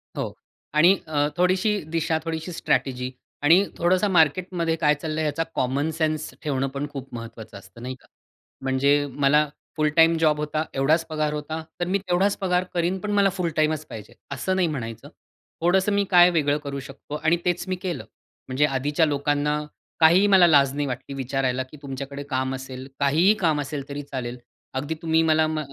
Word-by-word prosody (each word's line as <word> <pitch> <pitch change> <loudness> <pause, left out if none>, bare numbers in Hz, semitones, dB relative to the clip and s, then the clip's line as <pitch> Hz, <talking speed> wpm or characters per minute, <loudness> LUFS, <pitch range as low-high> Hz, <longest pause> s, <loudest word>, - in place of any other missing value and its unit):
हो - - -3 0.4
आणि 170 +6 +5
अ, 145 -2 +1
थोडीशी 185 +4 +2
दिशा, 160 -1 +1
थोडीशी 160 +2 -4
स्ट्रॅटेजी 130 -6 -1 0.3
आणि 170 +7 +6
थोडंस 180 +2 +2
मार्केटमध्ये 165 +1 +2
काय 150 -2 +3
चाललंय 155 +1 -3
याचा 150 +2 0
कॉमन 135 +4 0
सेन्स 155 -1 -1
ठेवणं 135 -2 0
पण 140 +2 -4
खूप 135 -2 -8
महत्वाचं 115 -3 -8
असतं, 100 +4 -15
नाही 130 +2 -5
का? 125 - -24 0.5
म्हणजे 140 +2 +2
मला 145 +3 +3 0.3
फुल 155 0 +2
टाईम 165 0 +5
जॉब 155 -2 +3
होता, 150 +1 -1
एवढाच 155 +5 +2
पगार 155 -1 -1
होता. 155 +2 -4 0.2
तर 175 - 0
मी 190 +2 +2
तेवढाच 190 +1 +1
पगार 180 -2 +1
करीन, 175 +2 0
पण 205 +3 -4
मला 200 -1 +4
फुल 180 -2 -2
टाईमच 155 0 +1
पाहिजे, 105 -3 -9 0.2
असं 185 +7 -1
नाही 185 -2 +2
म्हणायचं. 115 -7 -5 0.5
थोडंसं 190 +4 +3
मी 200 0 +2
काय 175 -1 +8
वेगळं 145 -4 +1
करू 140 -1 -4
शकतो 140 +2 -9
आणि 160 +3 +2
तेच 175 -1 0
मी 185 - -1
केलं. 180 -3 -3 0.4
म्हणजे 135 +3 +2
आधीच्या 145 +3 +1
लोकांना 145 0 0 0.4
काहीही 170 +5 +6
मला 190 -3 +6
लाज 140 -4 +4
नाही 145 0 -1
वाटली 130 +2 -5
विचारायला, 130 -1 -1
की 130 +4 -14
तुमच्याकडे 140 0 -6
काम 130 -1 -1
असेल, 130 0 -8
काहीही 155 +8 +4
काम 160 -7 +1
असेल 140 -1 -5
तरी 140 +1 -4
चालेल. 125 -2 -4 0.4
अगदी 140 +4 -2
तुम्ही 160 -1 +2
मला 160 0 +3
म 155 0 -2
150 Hz, 175 wpm, -24 LUFS, 135-170 Hz, 0.5 s, काय